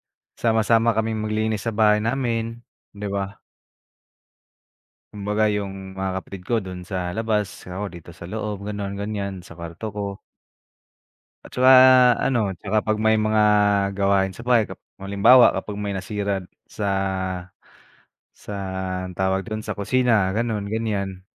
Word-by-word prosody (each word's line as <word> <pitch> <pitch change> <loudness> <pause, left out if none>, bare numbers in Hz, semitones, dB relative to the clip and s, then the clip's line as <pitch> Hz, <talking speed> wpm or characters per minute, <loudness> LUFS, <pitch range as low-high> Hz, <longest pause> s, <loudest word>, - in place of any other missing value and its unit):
magsama-sama 115 0 +1
kaming 110 0 -1
maglinis 110 0 -1
sa 115 - -1
bahay 105 -1 +4
namin, 115 -1 -2 0.3
'di 105 0 -5
ba? 100 0 -4 1.7
Kumbaga 105 +1 0
yung 95 -2 -5
mga 95 0 -2
kapatid 95 0 -8
ko 120 - +2
do'n 90 -1 -7
sa 90 -2 -3
labas, 110 -4 -2
ako 95 +3 -4
dito 85 -1 -11
sa 85 0 -11
loob, 105 +1 -5
gano'n, 100 -1 -4
ganyan, 100 -1 -3
sa 85 - -12
kwarto 85 +5 -8
ko. 100 -1 -4 1.3
At - - -14
saka 130 +1 +6 0.5
ano, 115 -7 +1
tsaka 105 +4 -2
'pag 110 0 +1
may 110 0 +4
mga 110 0 +2 0.6
gawain 100 -1 +2
sa 115 +6 -11
bahay 120 -3 +4
kap - - -9
kapag 95 +1 -11
halimbawa, 120 +5 +7
kapag 105 - -5
may 100 0 -3
nasira 100 +1 -2 0.3
sa 105 - -3 1.5
sa 105 - -9 0.6
anong 90 - -12
tawag 95 0 +1
do'n? 110 -1 -4
Sa - - -3
kusina, 110 -2 +2
gano'n, 110 -3 -1
ganyan. 100 -4 -2
105 Hz, 140 wpm, -23 LUFS, 95-110 Hz, 1.7 s, halimbawa